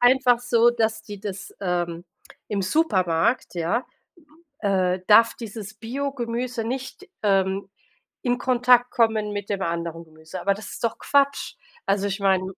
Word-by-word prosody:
einfach 245 0 +5
so, 240 -1 +4
dass 220 -2 0
die 205 -3 -9
das, 200 -1 -6
ähm, 175 -2 -2 0.4
im 200 -2 -1
Supermarkt, 185 - +1
ja, 175 +9 0 0.8
äh 190 -3 +1
darf 230 +2 +6
dieses 215 -2 -7
Biogemüse 245 0 -3
nicht, 260 - -5 0.2
ähm, 195 -1 +1 0.5
in 245 -1 +1
Kontakt 250 -1 +4
kommen 220 -3 +2
mit 205 -1 -5
dem 200 -2 -1
anderen 170 -1 -3
Gemüse, 160 +3 -10
aber 200 +2 +2
das 210 +2 -9
ist - - -9
doch 230 - 0
Quatsch. 280 0 +1 0.3
Also 200 0 +1
ich 195 +1 -3
meine. 190 -2 +3
210 Hz, 145 wpm, -24 LUFS, 190-245 Hz, 0.8 s, darf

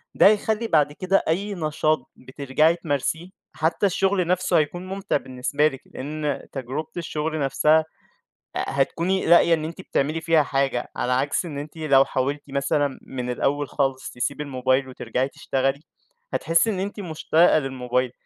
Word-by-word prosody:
ده - - +7
هيخلّي 215 +2 +2
بعد 150 -6 +3
كده 185 +5 +1
أي 200 +6 0
نشاط 155 -2 0
بترجَعي 140 +5 +1
تمارسيه، 160 +1 -2 0.3
حتى 160 +5 +1
الشغل 195 -1 +1
نَفْسه 180 +1 +2
هيكُون 175 +4 -1
ممتع 195 -1 -1
بالنسبة 130 +3 0
لِك، 135 -4 -6
لإن 150 +1 -4
تجربة 135 +3 -4
الشغل 155 -1 -3
نَفْسها 150 +3 +3 0.8
أ - - 0
هتكُوني 170 +7 0
لاقية 170 0 +6
إن 155 -1 0
أنتِ 165 +4 -7
بتعملي 155 -2 -1
فيها 165 -2 +3
حاجة، 135 -3 -1
على 125 - -1
عكس 140 +7 0
إن 150 -4 -6
أنتِ 150 +3 -7
لو 140 -4 +4
حاولتِ 140 +3 -1
مثلًا 140 0 0
من 125 -1 -5
الأول 140 +3 0
خالص 135 -2 -1
تسيبي 140 +4 -3
الموبايل 130 -1 0
وترجَعي 125 +1 -2
تشتغلي، 135 +1 -1 0.5
هتحسي 165 +7 +2
إن 200 -4 -1
أنتِ 200 +2 -4
مشتاقة 165 -2 +3
للموبايل. 125 -2 -1
150 Hz, 150 wpm, -24 LUFS, 135-170 Hz, 0.8 s, ده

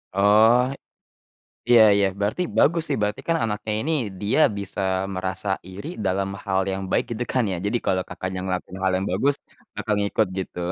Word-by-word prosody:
Oh, 110 +4 +5 1.1
iya 120 -2 +8
iya, 100 -1 +3
berarti 105 - 0
bagus 165 +2 +4
sih - - 0
berarti 105 0 -1
kan 165 - +3
anaknya 105 0 -3
ini 160 +6 -1 0.3
dia 105 +9 +1 0.2
bisa 100 0 -5 0.3
merasa 95 +2 -3 0.2
iri 100 - -8 0.2
dalam 95 +1 0 0.2
hal 95 -1 +1
yang 95 0 -3
baik - - +2
gitu 120 +1 -2
kan 125 - +2
ya. - - -2
Jadi 115 +4 0
kalau 95 -1 +1
kakaknya 95 +1 -5
ngelakuin 95 0 -4
hal 95 - +2
yang 95 +2 -2
bagus 140 +1 +2 0.4
bakal 105 - -1
ngikut 100 +1 +1
gitu. 95 - -5
100 Hz, 175 wpm, -23 LUFS, 95-115 Hz, 1.1 s, iya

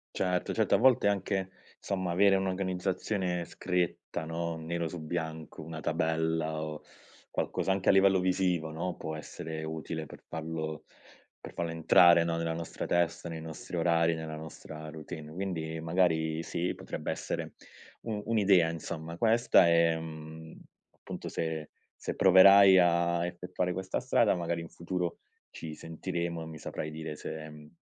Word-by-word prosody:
Certo, 90 -1 0
certo, - - +2
a - - +7
volte 125 -4 +5
anche 95 -1 0 0.3
insomma 95 -3 -2
avere 100 +2 +5
un'organizzazione 95 -1 -1
scritta, 90 -3 -2
no, 85 0 -3
nero 85 +1 -3
su 85 +1 -6
bianco, 80 -1 -5
una 80 0 -7
tabella 80 -1 0
o, 75 -1 -6 0.5
qualcosa 95 - -1
anche 95 0 +1
a - - +9
livello 95 0 +5
visivo, 90 -3 +1
no, 85 +3 -3
può 80 0 -5
essere 80 +1 -6
utile 80 0 -5
per - - -13
farlo 80 -1 -4 0.6
per - - -10
farlo 85 -1 -2
entrare 85 +1 +6
no, 85 -1 0
nella 85 0 -1
nostra 85 0 -5
testa, 85 0 0
nei 80 -1 -5
nostri 80 +2 -7
orari, 85 0 +3
nella 80 -1 -5
nostra 80 0 -9
routine. 80 0 -8
Quindi 80 -3 -4
magari 80 -1 +1
sì, 85 +1 -2
potrebbe - - -5
essere, - - -4 0.5
u 110 -2 -3
un'idea 100 -6 +4
insomma, 80 0 -5
questa 115 -3 +5
e, 85 -1 +4
mhmm, 80 0 -9 0.4
appunto - - -7
se 80 -2 -3 0.3
se - - -5
proverai 95 +1 +8
a 85 -1 +3
effettuare 90 +1 -3
questa 95 +1 -2
strada 120 -3 +3
magari 85 -1 -2
in 80 - -9
futuro, 85 0 -3 0.3
ci 80 -2 -7
sentiremo 85 +1 -4
e 80 - -6
mi 80 -1 -8
saprai 75 +1 -5
dire 80 0 -6
se 80 +1 -6
mhmm, 75 0 -13
85 Hz, 150 wpm, -30 LUFS, 80-90 Hz, 0.6 s, a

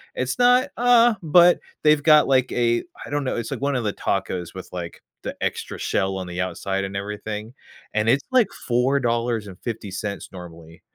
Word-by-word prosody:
it's 130 - -2
not, 250 +3 +5
uh 240 -1 +5
but 175 +2 +5 0.2
they've 150 -1 +5
got, 150 0 +6
like, 130 -1 +3
a 120 -1 +1 0.2
I - - -10
don't 145 -1 -2
know, - - -1
it's, 115 -1 -4
like, - - -3
one 140 0 0
of 125 - -1
the 105 - 0
tacos 90 -3 -3
with, 95 - -8
like, 85 -2 -7 0.2
the - - -5
extra - - -3
shell 95 0 -1
on 95 - -5
the 90 0 -6
outside, 95 +2 -2
and 95 0 -7
everything, 105 +2 -5 0.4
and 105 +1 0
it's, 130 +4 +3
like, 250 -5 +4 0.2
$4.50 115 -5 -2
normally, 85 -2 -12
115 Hz, 175 wpm, -23 LUFS, 95-145 Hz, 0.4 s, got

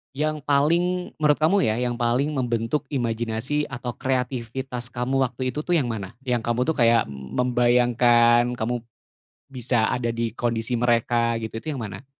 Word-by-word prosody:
yang 155 +1 -1
paling 170 +6 +1
menurut 150 -1 +3
kamu 175 +6 +3
ya 110 - +1
yang 125 -1 -1
paling 125 +5 0
membentuk 120 +1 -1
imajinasi 120 +3 -2
atau 125 -3 -5
kreativitas 125 -1 -3
kamu 130 +3 -1
waktu 130 0 -2
itu 150 - -3
tuh 175 - +1
yang 135 -6 0
mana? 105 -5 -4
Yang 125 -2 0
kamu 120 +1 0
tuh 160 - +1
kayak 115 - +4
membayangkan 120 - +3
kamu, 115 +2 -1 0.8
bisa 125 -3 +1
ada 120 -1 -1
di 115 -1 -3
kondisi 115 0 -2
mereka 115 0 +1
gitu 110 -1 -6
itu 155 - -6
yang 125 - -5
mana? 100 +5 -9
120 Hz, 160 wpm, -24 LUFS, 115-135 Hz, 0.8 s, kayak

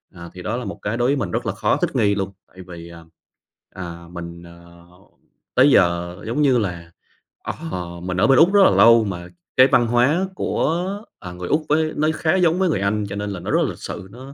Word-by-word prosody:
À, 85 0 -10
thì 90 - -10
đó 120 - -3
là 125 - -5
một - - -7
cái 105 +3 -2
đối 120 +1 +1
với 145 - +2
mình 135 - -3
rất - - -2
là - - -1
khó - - 0
thích - - -2
nghi 100 -1 +2
luôn, 100 -1 -3 0.2
tại 95 - -26
vì, 85 -1 -10
à, 85 -1 -12 0.7
à, 85 -2 -8
mình, 85 -1 -8
ờ, 85 0 -16 0.7
tới 130 +3 +6
giờ, 85 -2 +2
giống 120 +6 -1
như 135 -4 +4
là, 85 -6 -4 0.5
ờ, - - -4 0.5
mình 90 0 -3
ở - - +3
bên 135 -2 +5
Úc 175 +5 +5
rất 205 - +6
là - - +7
lâu 115 -1 +6
mà 90 -4 -5 0.3
cái 130 +1 +8
văn 120 -3 +3
hóa 130 +10 +2
của, 170 +1 -1 0.3
à, 90 -2 -8
người 90 0 -7
Úc 155 +1 0
với 155 +1 +1
nó 155 +1 +1
khá 160 +3 +1
giống 180 -1 +2
với 190 - +2
người 100 - 0
Anh, 105 +1 0
cho 100 - -5
nên 105 0 -4
là 95 - -5
nó - - -5
rất - - +3
là - - -1
lịch - - -8
sự, 95 - -7
nó, 130 +5 -11
105 Hz, 245 wpm, -21 LUFS, 85-135 Hz, 0.7 s, cái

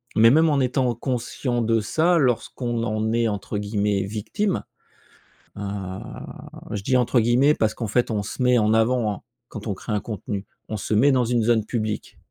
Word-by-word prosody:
mais 115 +1 +7
même 160 +4 +5
en 145 -2 +2
étant 125 -1 +1
conscient 120 0 -2
de 115 0 +2
ça, 165 +11 +2
lorsqu'on 120 -3 0
en 110 -1 -1
est 115 0 +2
entre 105 0 -3
guillemets 100 -1 0
«victime», 115 - -2 0.9
heu, - - -6 1.1
je 100 -2 -3
dis 130 +4 +2
entre 125 0 +3
guillemets 125 +6 +4
parce 110 -6 0
qu'en 115 0 -4
fait 120 +3 +1
on 105 -2 0
se 110 +5 -4
met 125 0 +4
en 110 -1 +3
avant, 115 0 +2
hein, 100 - -10 0.3
quand 105 -2 -8
on 105 - 0
crée 105 +3 -5
un 105 - 0
contenu, 105 -2 -5 0.2
on 110 - -4
se 105 - -3
met 135 +7 +5
dans 130 -1 +3
une 120 -1 +1
zone 110 -2 +2
publique. 110 -2 -3
115 Hz, 190 wpm, -23 LUFS, 105-125 Hz, 1.1 s, mais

